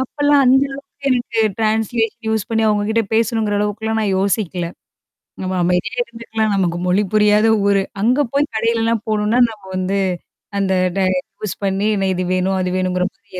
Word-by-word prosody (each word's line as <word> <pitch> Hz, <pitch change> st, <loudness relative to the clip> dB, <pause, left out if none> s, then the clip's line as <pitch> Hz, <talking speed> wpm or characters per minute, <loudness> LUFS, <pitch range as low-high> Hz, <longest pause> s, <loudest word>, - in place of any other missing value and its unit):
அப்பல்லாம் 290 Hz, +2 st, +2 dB
அந்த 265 Hz, +2 st, +5 dB
அளவுக்கு 275 Hz, 0 st, -10 dB
எனக்கு 240 Hz, -2 st, -1 dB, 0.2 s
ட்ரான்ஸ்லேஷன் 225 Hz, +1 st, 0 dB
யூஸ் 220 Hz, -2 st, 0 dB
பண்ணி 225 Hz, 0 st, +1 dB
அவங்ககிட்ட 215 Hz, +2 st, +1 dB
பேசணுங்கிற 220 Hz, -2 st, +1 dB
அளவுக்கல்லாம் 220 Hz, +2 st, -1 dB
நான் 200 Hz, -3 st, 0 dB
யோசிக்கல. 190 Hz, -3 st, -1 dB, 0.8 s
நம்ம 185 Hz, 0 st, -3 dB
அமைதியா 180 Hz, +7 st, 0 dB
இருந்துக்கலாம். 225 Hz, -2 st, -3 dB
நமக்கு 175 Hz, -3 st, 0 dB
மொழி 185 Hz, +3 st, +2 dB
புரியாத 210 Hz, +1 st, +4 dB, 0.2 s
ஊரு. 200 Hz, -1 st, +3 dB, 0.2 s
அங்க 245 Hz, +6 st, +2 dB
போய் 290 Hz, +1 st, +1 dB
கடையிலலாம் 230 Hz, 0 st, 0 dB
போணும்ன்னா 215 Hz, +3 st, +1 dB
நம்ம 215 Hz, -3 st, -12 dB
வந்து, 185 Hz, +2 st, -1 dB, 0.6 s
அந்த 190 Hz, -1 st, +1 dB, 0.2 s
ட -, -, +1 dB, 0.4 s
யூஸ் 210 Hz, -, -3 dB
பண்ணி 195 Hz, +2 st, 0 dB
என்ன 195 Hz, -1 st, 0 dB
இது 180 Hz, 0 st, -2 dB
வேணும், 190 Hz, +1 st, 0 dB
அது 180 Hz, -, -1 dB
வேணும்ங்கிற 185 Hz, 0 st, 0 dB
மாரி 195 Hz, -4 st, -11 dB
215 Hz, 155 wpm, -19 LUFS, 195-230 Hz, 0.8 s, அந்த